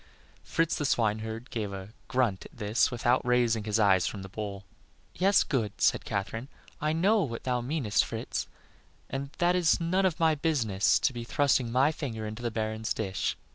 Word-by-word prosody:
Fritz, 165 Hz, -2 st, 0 dB
the -, -, -2 dB
swineherd, 110 Hz, 0 st, -1 dB
gave 105 Hz, -4 st, -3 dB
a 95 Hz, 0 st, -7 dB, 0.2 s
grunt 120 Hz, -8 st, 0 dB
at -, -, -14 dB
this 105 Hz, +1 st, +2 dB
without 120 Hz, +1 st, +1 dB
raising 120 Hz, -3 st, +2 dB
his 105 Hz, 0 st, 0 dB
eyes 95 Hz, -5 st, +4 dB
from 100 Hz, -3 st, -5 dB
the 95 Hz, -, -8 dB
bowl. 100 Hz, 0 st, -5 dB, 0.5 s
"Yes, 195 Hz, +3 st, +4 dB
good," 110 Hz, -7 st, -2 dB
said -, -, +2 dB
Katherine, 100 Hz, +5 st, -3 dB, 0.3 s
"I 150 Hz, +1 st, +1 dB
know 195 Hz, +7 st, +3 dB
what 115 Hz, -9 st, -4 dB
thou 125 Hz, -1 st, 0 dB
meanest, 125 Hz, -4 st, +1 dB
Fritz, -, -, -4 dB, 0.6 s
and 135 Hz, +1 st, -3 dB
that 175 Hz, +1 st, +3 dB
it -, -, +3 dB
is 170 Hz, 0 st, +3 dB
none 185 Hz, +3 st, +2 dB
of 180 Hz, -1 st, -3 dB
my 160 Hz, -1 st, +4 dB
business 130 Hz, -, +2 dB
to 135 Hz, -, +1 dB
be 120 Hz, -1 st, -5 dB
thrusting 130 Hz, -1 st, +1 dB
my 135 Hz, +5 st, +4 dB
finger 115 Hz, -8 st, -5 dB
into 110 Hz, +2 st, -6 dB
the 120 Hz, -, -1 dB
Baron's 110 Hz, 0 st, -2 dB
dish. 95 Hz, -3 st, -2 dB
120 Hz, 185 wpm, -29 LUFS, 110-145 Hz, 0.6 s, eyes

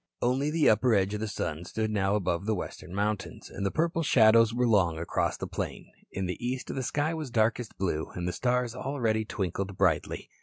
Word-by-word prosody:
Only 130 Hz, +4 st, +1 dB
the 155 Hz, 0 st, +2 dB
upper 110 Hz, +2 st, +4 dB
edge 100 Hz, 0 st, +1 dB
of 105 Hz, -, -2 dB
the 110 Hz, -, -2 dB
sun 80 Hz, -5 st, -3 dB
stood 110 Hz, +4 st, -2 dB
now 100 Hz, -1 st, +1 dB
above 95 Hz, -1 st, -1 dB
the 110 Hz, -, +2 dB
western 90 Hz, -, -7 dB
mountains, 105 Hz, 0 st, -2 dB
and 100 Hz, -, -5 dB
the 100 Hz, -, +2 dB
purple 165 Hz, -, 0 dB
shadows 115 Hz, -5 st, +5 dB
were 125 Hz, +1 st, +1 dB
long 95 Hz, -7 st, +3 dB
across 85 Hz, -, -1 dB
the -, -, -4 dB
plain. -, -, -5 dB, 0.2 s
In 95 Hz, -, -3 dB
the 90 Hz, +7 st, -4 dB
east 125 Hz, +1 st, -3 dB
the 135 Hz, -, -2 dB
sky 145 Hz, +5 st, 0 dB
was 155 Hz, -4 st, -4 dB
darkest 115 Hz, 0 st, 0 dB
blue 85 Hz, -5 st, -1 dB
and 90 Hz, 0 st, -3 dB
the 90 Hz, -, -1 dB
stars 125 Hz, +2 st, 0 dB
already 120 Hz, -4 st, -1 dB
twinkled 95 Hz, -1 st, -3 dB
brightly. 90 Hz, -6 st, +1 dB
110 Hz, 205 wpm, -29 LUFS, 95-125 Hz, 0.2 s, shadows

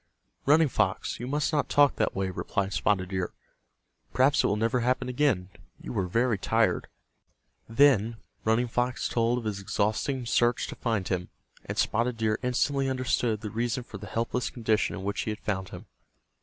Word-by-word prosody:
"Running 155 Hz, +2 st, +6 dB
Fox, -, -, -1 dB
you 120 Hz, -, -5 dB
must 145 Hz, +3 st, 0 dB
not 150 Hz, -, +1 dB
talk 145 Hz, -1 st, +4 dB
that -, -, 0 dB
way," 95 Hz, -1 st, -1 dB
replied 100 Hz, +2 st, -2 dB
Spotted 95 Hz, 0 st, +1 dB
Deer. 95 Hz, -2 st, -2 dB, 0.8 s
"Perhaps 135 Hz, +4 st, +4 dB
it -, -, +3 dB
will 100 Hz, -, +1 dB
never 115 Hz, +4 st, +1 dB
happen 125 Hz, +2 st, 0 dB
again. 125 Hz, -9 st, +1 dB, 0.3 s
You -, -, -7 dB
were 95 Hz, -5 st, -1 dB
very 115 Hz, +2 st, +1 dB
tired." 110 Hz, -2 st, +1 dB, 0.8 s
Then 115 Hz, -3 st, +4 dB, 0.3 s
Running 115 Hz, +3 st, +2 dB
Fox 120 Hz, +2 st, -1 dB
told 120 Hz, +1 st, +1 dB
of 125 Hz, -, -4 dB
his 105 Hz, -2 st, -3 dB
exhausting 110 Hz, +7 st, -1 dB
search 120 Hz, +1 st, +2 dB
to -, -, -6 dB
find 110 Hz, -6 st, -1 dB
him, 90 Hz, -2 st, -2 dB, 0.4 s
and -, -, -5 dB
Spotted 115 Hz, +2 st, +1 dB
Deer 110 Hz, -1 st, 0 dB
instantly 135 Hz, +2 st, +1 dB
understood 125 Hz, -4 st, 0 dB
the 105 Hz, -2 st, -5 dB
reason 120 Hz, +2 st, -1 dB
for 105 Hz, -3 st, -10 dB
the 105 Hz, -, -8 dB
helpless 115 Hz, +3 st, -1 dB
condition 110 Hz, -3 st, 0 dB
in 95 Hz, -, -6 dB
which 100 Hz, +1 st, -2 dB
he -, -, -3 dB
had 105 Hz, -, -4 dB
found 95 Hz, -2 st, -3 dB
him. -, -, -9 dB
115 Hz, 180 wpm, -28 LUFS, 105-125 Hz, 0.8 s, Running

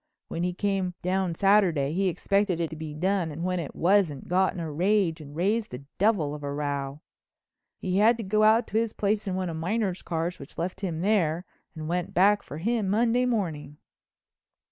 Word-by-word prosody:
When 165 Hz, -, -3 dB
he 180 Hz, +1 st, 0 dB
came 190 Hz, -1 st, -1 dB
down 185 Hz, -1 st, 0 dB
Saturday 180 Hz, -8 st, +3 dB
he 195 Hz, +2 st, +1 dB
expected 195 Hz, 0 st, +1 dB
it 165 Hz, -2 st, -1 dB
to -, -, -6 dB
be 155 Hz, -1 st, -7 dB
done 185 Hz, +1 st, 0 dB
and 160 Hz, +3 st, -6 dB
when 180 Hz, 0 st, 0 dB
it 160 Hz, -, -6 dB
wasn't, 175 Hz, -6 st, +2 dB
got 185 Hz, +1 st, +2 dB
in -, -, -7 dB
a 160 Hz, -2 st, -4 dB
rage 180 Hz, 0 st, +1 dB
and 145 Hz, -1 st, -11 dB
raised 210 Hz, +6 st, 0 dB
the 125 Hz, +2 st, -8 dB, 0.2 s
devil 190 Hz, -8 st, +2 dB
of 150 Hz, -, -7 dB
a 140 Hz, -1 st, -4 dB
row. 140 Hz, 0 st, -3 dB, 0.8 s
He 185 Hz, +1 st, -1 dB
had 225 Hz, +3 st, +5 dB
to 230 Hz, -, -4 dB
go 215 Hz, +2 st, +1 dB
out 220 Hz, +2 st, +5 dB
to 220 Hz, -, +1 dB
his 230 Hz, -1 st, -1 dB
place 205 Hz, +1 st, -1 dB
in 185 Hz, -, -1 dB
one 185 Hz, -1 st, -2 dB
of 165 Hz, -2 st, -4 dB
Miner's 190 Hz, +2 st, -1 dB
cars 170 Hz, +1 st, -3 dB
which 140 Hz, -, -11 dB
left 180 Hz, +3 st, -3 dB
him 170 Hz, -5 st, -2 dB
there 180 Hz, -4 st, +1 dB, 0.3 s
and 155 Hz, -1 st, -6 dB
went 175 Hz, +1 st, -2 dB
back 200 Hz, +3 st, +5 dB
for 145 Hz, -, -9 dB
him 215 Hz, +3 st, 0 dB
Monday 235 Hz, +4 st, +2 dB
morning." 160 Hz, -, -2 dB
180 Hz, 205 wpm, -27 LUFS, 160-205 Hz, 0.8 s, had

